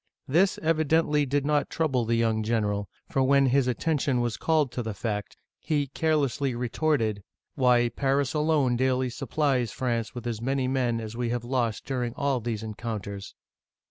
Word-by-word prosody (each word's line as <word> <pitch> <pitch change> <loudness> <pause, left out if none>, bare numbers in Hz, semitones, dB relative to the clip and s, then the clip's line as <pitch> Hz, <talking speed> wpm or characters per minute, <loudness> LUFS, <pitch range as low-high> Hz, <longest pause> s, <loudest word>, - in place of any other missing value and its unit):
This 180 +8 +3
evidently 155 -2 +2
did 140 +1 0
not 150 0 +1
trouble 135 -7 0
the 115 +1 +1
young 115 -1 +1
general, 105 -2 -1 0.2
for 135 - 0
when 140 +1 +4
his 130 0 +3
attention 135 0 0
was 120 -2 0
called 155 -5 +1
to 125 - -3
the 110 -3 -4
fact, 105 -1 -4 0.2
he 145 -2 0
carelessly 140 -3 0
retorted, 120 -3 0 0.3
"Why, 125 -3 +4
Paris 135 +1 0
alone 150 -5 +2
daily 130 0 +1
supplies 130 -2 0
France 120 -2 -2
with 120 - -6
as 115 -2 -3
many 135 +1 0
men 125 -3 0
as 110 0 -6
we 120 0 -1
have 120 0 -2
lost 120 -3 -1
during 125 -3 -2
all 140 -2 0
these 110 -2 -3
encounters 105 -3 -6
125 Hz, 165 wpm, -27 LUFS, 115-140 Hz, 0.3 s, when